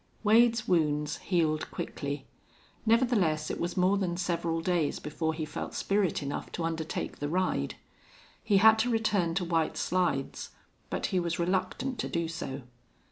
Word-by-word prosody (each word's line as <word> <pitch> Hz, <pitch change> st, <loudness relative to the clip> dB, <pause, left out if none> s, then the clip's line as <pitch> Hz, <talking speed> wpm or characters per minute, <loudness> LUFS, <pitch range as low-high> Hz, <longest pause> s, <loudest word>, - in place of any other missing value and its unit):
Wade's 230 Hz, +1 st, +4 dB
wounds 150 Hz, -3 st, +1 dB
healed 160 Hz, -4 st, 0 dB
quickly; 140 Hz, -1 st, -4 dB, 0.6 s
nevertheless, 215 Hz, -10 st, +2 dB
it -, -, -4 dB
was 175 Hz, +2 st, -2 dB
more 185 Hz, +2 st, +3 dB
than 175 Hz, -3 st, -1 dB
several 170 Hz, -2 st, -1 dB
days 165 Hz, -3 st, 0 dB
before 160 Hz, +2 st, -2 dB
he 155 Hz, -1 st, -3 dB
felt 150 Hz, -, -6 dB
spirit 195 Hz, -6 st, +1 dB
enough 140 Hz, 0 st, -4 dB
to 170 Hz, -, -3 dB
undertake 160 Hz, -1 st, -3 dB
the 145 Hz, -, -2 dB
ride. 175 Hz, -, 0 dB, 0.7 s
He 200 Hz, -, +3 dB
had 220 Hz, +2 st, +7 dB
to 245 Hz, +3 st, +2 dB
return 205 Hz, -7 st, +1 dB
to 180 Hz, -1 st, 0 dB
White 165 Hz, -2 st, 0 dB
Slides, 180 Hz, -7 st, -1 dB, 0.4 s
but -, -, -2 dB
he 185 Hz, -, +3 dB
was 170 Hz, -1 st, -1 dB
reluctant 190 Hz, +9 st, -1 dB
to -, -, -2 dB
do 170 Hz, -1 st, -1 dB
so. 140 Hz, -5 st, -5 dB
170 Hz, 155 wpm, -29 LUFS, 155-195 Hz, 0.7 s, had